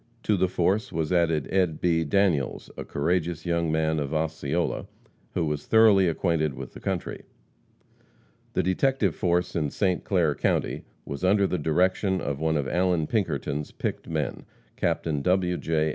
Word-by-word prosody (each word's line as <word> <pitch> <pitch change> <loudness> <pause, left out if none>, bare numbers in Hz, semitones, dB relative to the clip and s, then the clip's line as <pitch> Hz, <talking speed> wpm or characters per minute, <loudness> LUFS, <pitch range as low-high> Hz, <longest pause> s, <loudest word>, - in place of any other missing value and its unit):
To 105 - +2
the 95 -1 +2
force 95 +4 0
was 80 +1 -1
added 80 -4 +2
Ed. 90 -5 +1
B. 85 -2 +2
Daniels, 80 -3 0
a - - -5
courageous 85 +2 -1
young 85 -2 0
man 80 0 +1
of 75 +1 -3
Osceola, 80 +1 -1 0.5
who 85 - +1
was 75 -1 -3
thoroughly 110 -4 +6
acquainted 80 -4 0
with - - -8
the - - -10
country. - - -3 1.3
The - - +1
detective 100 - +1
force 90 0 0
in 75 -4 0
St. 90 +3 0
Clair 85 -6 +2
county - - -1 0.2
was 70 +4 -6
under 100 +2 +4
the 90 -2 -1
direction 95 +5 +1
of 70 -3 -3
one 80 0 +1
of 70 -2 -1
Allan 90 -1 +1
Pinkerton's 75 -8 -2
picked - - -4
men, 75 -6 -3 0.3
Captain 75 -4 -1
W. 90 +2 +2
J. 80 -2 0
85 Hz, 160 wpm, -26 LUFS, 75-95 Hz, 1.3 s, thoroughly